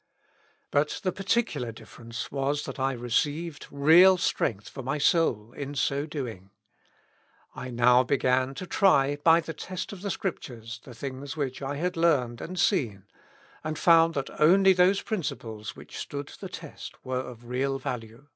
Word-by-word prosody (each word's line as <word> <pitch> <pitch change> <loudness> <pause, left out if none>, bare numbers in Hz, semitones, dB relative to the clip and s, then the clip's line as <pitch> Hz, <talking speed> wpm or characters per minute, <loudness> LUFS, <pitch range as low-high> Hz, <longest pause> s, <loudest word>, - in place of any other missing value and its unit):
" - - -35 0.3
But 145 +1 +1
the 185 - +1
particular 195 - -1
difference 115 +1 -8
was 140 +2 -1
that - - -7
I 135 0 +1
received 145 +7 -1
real 165 +7 +6
strength 105 - -1
for - - -8
my 135 +4 -2
soul 125 -9 +2
in 140 +1 -6
so 140 +1 0
doing: 115 - -6 1.0
I 130 - -7
now 125 +1 +5
began 130 0 +1
to 185 - -6
try 145 -7 +3
by 165 +3 +5
the 165 0 -6
test 185 +5 -6
of 190 - -10
the 200 - -3
Scrip 190 -2 -2
tures 115 -2 -9
the 125 -2 -12
things 135 +4 -6
which 130 -3 -3
I 140 +1 -3
had 180 +5 -2
learned 135 -8 +2
and 185 +1 -5
seen, 110 - +1 0.6
and 155 0 -3
found 165 0 +5
that 135 -1 -3
only 190 +5 +6
those 185 +2 +3
principles 115 - -4
which - - -12
stood 140 0 -5
the - - -9
test - - -9
were 130 0 -1
of 120 -2 -10
real 135 +3 -1
value." 115 0 -6
140 Hz, 165 wpm, -27 LUFS, 125-165 Hz, 1.0 s, real